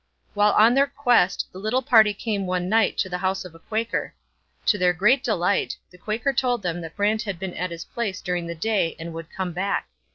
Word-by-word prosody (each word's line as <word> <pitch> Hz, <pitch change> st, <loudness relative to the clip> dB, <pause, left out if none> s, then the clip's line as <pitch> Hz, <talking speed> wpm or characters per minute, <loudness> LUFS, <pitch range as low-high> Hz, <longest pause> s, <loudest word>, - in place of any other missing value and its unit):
While 205 Hz, 0 st, +3 dB
on 225 Hz, +3 st, +6 dB
their 275 Hz, +2 st, +4 dB
quest 245 Hz, -9 st, +2 dB
the 185 Hz, -, -10 dB
little 220 Hz, +6 st, 0 dB
party 225 Hz, -5 st, +6 dB
came 205 Hz, -2 st, -3 dB
one 180 Hz, -1 st, -1 dB
night 220 Hz, +1 st, +2 dB
to 190 Hz, -, +1 dB
the 180 Hz, -1 st, -4 dB
house 190 Hz, 0 st, -1 dB
of 180 Hz, -, -10 dB
a 165 Hz, -, -15 dB
Quaker. 225 Hz, +6 st, -3 dB, 0.5 s
To 205 Hz, -, +3 dB
their 180 Hz, -1 st, +3 dB
great 235 Hz, +10 st, +3 dB
delight, 200 Hz, -3 st, 0 dB
the 180 Hz, -, -16 dB
Quaker 230 Hz, +8 st, -1 dB
told 245 Hz, -3 st, 0 dB
them 175 Hz, -1 st, -2 dB
that 165 Hz, -1 st, -8 dB
Brant 210 Hz, +2 st, +1 dB
had 200 Hz, -5 st, -4 dB
been 185 Hz, 0 st, -5 dB
at 180 Hz, +1 st, -3 dB
his 170 Hz, 0 st, -7 dB
place 210 Hz, -6 st, -3 dB
during 180 Hz, -1 st, -3 dB
the 170 Hz, -, -5 dB
day 190 Hz, -2 st, 0 dB
and 165 Hz, 0 st, -7 dB
would 165 Hz, 0 st, -8 dB
come 185 Hz, -2 st, -4 dB
back. 195 Hz, +3 st, -2 dB
195 Hz, 225 wpm, -24 LUFS, 180-225 Hz, 0.5 s, on